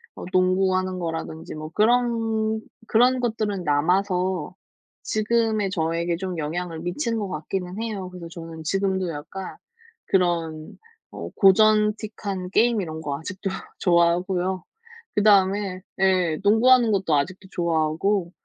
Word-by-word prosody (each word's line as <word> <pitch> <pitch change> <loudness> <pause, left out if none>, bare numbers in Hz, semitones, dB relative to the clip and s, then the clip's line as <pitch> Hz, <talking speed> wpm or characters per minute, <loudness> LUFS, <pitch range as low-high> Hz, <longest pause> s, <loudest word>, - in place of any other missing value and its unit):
어 - - -8
농구하는 185 0 +2
거라든지 165 -2 -5
뭐 155 0 -7
그런 225 -1 +2 0.3
그런 250 +3 +4
것들은 215 -6 -1
남아서 180 +3 +1 0.5
지금의 215 -1 +1
저에게 170 -1 -1
좀 180 -1 -4
영향을 165 +2 -3
미치는 225 - -2
것 205 - -2
같기는 180 +4 -4
해요. 200 -5 -4
그래서 180 -2 -9
저는 165 -2 -9
지금도 190 0 0
약간 165 +5 -7 0.5
그런 165 -4 0 0.3
어 - - -7
고전틱한 210 -1 +3
게임 230 0 +3
이런 160 -2 -5
거 145 -2 -3
아직도 185 +4 -5 0.3
좋아하고요. 180 +1 +2 0.5
그다음에 200 -2 +3 0.2
예 185 -4 +2
농구하는 230 +3 +5
것도 190 -6 +1
아직도 185 +7 -2
좋아하고 170 +3 0
185 Hz, 285 characters per minute, -24 LUFS, 170-210 Hz, 0.5 s, 농구하는